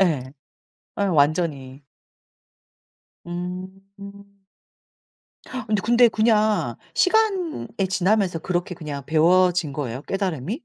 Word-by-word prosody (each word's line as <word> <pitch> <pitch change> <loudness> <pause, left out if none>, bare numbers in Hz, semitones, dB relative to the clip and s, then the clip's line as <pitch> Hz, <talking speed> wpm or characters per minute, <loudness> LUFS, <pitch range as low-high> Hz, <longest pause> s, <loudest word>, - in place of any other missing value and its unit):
예. 145 -9 +1 0.7
예 - - +2
완전히. 145 -4 0 1.4
음. 195 +3 -9 1.1
어 255 -4 -6 0.2
근데 240 +3 +5
그냥 215 - +1 0.2
시간이 380 -5 +1 0.2
지나면서 190 -1 +1
그렇게 180 +1 -3
그냥 150 -4 -6
배워진 170 0 +3
거예요, 135 -2 -4
깨달음이? 190 - -3
185 Hz, 185 characters per minute, -23 LUFS, 155-200 Hz, 1.4 s, 근데